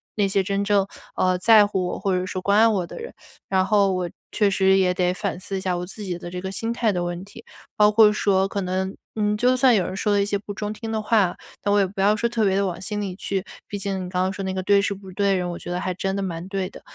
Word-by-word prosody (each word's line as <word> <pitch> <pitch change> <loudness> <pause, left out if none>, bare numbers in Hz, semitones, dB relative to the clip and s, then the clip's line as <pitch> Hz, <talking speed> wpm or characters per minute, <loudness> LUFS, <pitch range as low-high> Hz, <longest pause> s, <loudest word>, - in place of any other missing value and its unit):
那 205 -2 +2
些 195 0 +1
真 200 +1 -1
正， 200 -1 +3 0.3
呃， 185 0 +2
在 215 +2 +6
乎 190 -3 -1
我 - - -4
或 190 -2 0
者 180 - -2
说 185 0 -4
关 200 +2 +2
爱 225 - +7
我 195 -6 +1
的 - - -10
人。 470 - -8 0.3
然 190 -1 +2
后 200 -2 +3
我 180 -1 -2 0.2
确 205 -2 +3
实 190 0 +4
也 185 -1 +3
得 180 0 +1
反 190 -1 -3
思 195 +1 -6
一 - - -4
下 180 -2 -1
我 180 - -4
自 210 +3 -9
己 180 -3 -3
的 175 - -8
这 180 +1 -6
个 190 0 -4
心 225 +4 -3
态 230 -2 +1
的 180 -2 -1
问 175 +1 -4
题， 215 +3 -13 0.3
包 210 0 +6
括 215 0 +6
说 195 -2 +2
可 200 0 -3
能， 190 +1 -2 0.2
嗯， 210 -1 +1
就 250 +3 +3
算 255 -2 +5
有 190 -4 +2
人 185 - -5
说 205 +1 0
了 200 - +3
一 - - +1
些 200 0 0
不 205 0 -8
中 210 +1 -4
听 225 +1 -6
的 220 -1 -1
话， 210 -4 +2 0.3
那 205 - +1
我 205 - +4
也 195 - +4
不 195 +1 -10
要 205 +2 +4
说 235 +2 0
特 230 -2 0
别 190 - +2
的 200 0 +2
往 180 -3 -3
心 210 +2 -3
里 190 -3 -4
去， 195 0 -3 0.2
毕 205 - -5
竟 195 -1 -3
你 180 - -7
刚 180 0 0
刚 190 - 0
说 195 - -5
那 190 - -2
个 190 0 -3
对 200 +1 +4
事 200 0 -1
不 190 -1 -11
对 200 0 +1
人， 180 -1 -1
我 170 - -6
觉 - - -8
得 180 - -1
还 185 - -2
真 195 +1 -2
的 200 - -2
蛮 175 -1 -4
对 195 -1 -3
的。 - - -13
195 Hz, 325 characters per minute, -23 LUFS, 185-205 Hz, 0.3 s, 爱